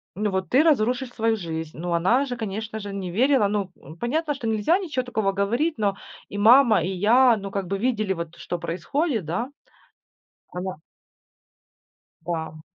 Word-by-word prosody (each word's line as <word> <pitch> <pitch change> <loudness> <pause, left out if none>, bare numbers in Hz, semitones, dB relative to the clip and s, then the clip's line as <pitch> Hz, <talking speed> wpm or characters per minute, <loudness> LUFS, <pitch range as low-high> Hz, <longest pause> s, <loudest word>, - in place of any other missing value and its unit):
Ну 210 +2 0
вот 190 -1 -2
ты 260 - +5
разрушишь 255 -4 +2
свою 225 -1 +1
жизнь. 160 -5 -5
Ну 175 +2 -3
она 190 +11 +3
же, 250 -2 -4
конечно 220 0 -4
же, 205 -1 -6
не 195 -2 -4
верила. 255 +2 +3
Ну, 200 -2 -2
м, 155 +4 -13
понятно, 295 - -1
что 240 -4 -5
нельзя 220 - +2
ничего 320 -10 -2
такого 220 -5 0
говорить, 235 +12 0
но 200 -2 0 0.3
и 205 - -6
мама, 225 -2 +6
и 180 - -1
я, 230 +6 +4
ну, 200 -1 -6
как 195 -1 -2
бы 195 +2 -1
видели 215 -4 0
вот, 170 -2 -6
что 175 - -5
происходит, 220 - -2
да. 180 +11 -2 1.0
Она 180 -2 -5 1.4
Да, 165 -1 -3
м. 155 - -13
210 Hz, 175 wpm, -24 LUFS, 185-245 Hz, 1.4 s, мама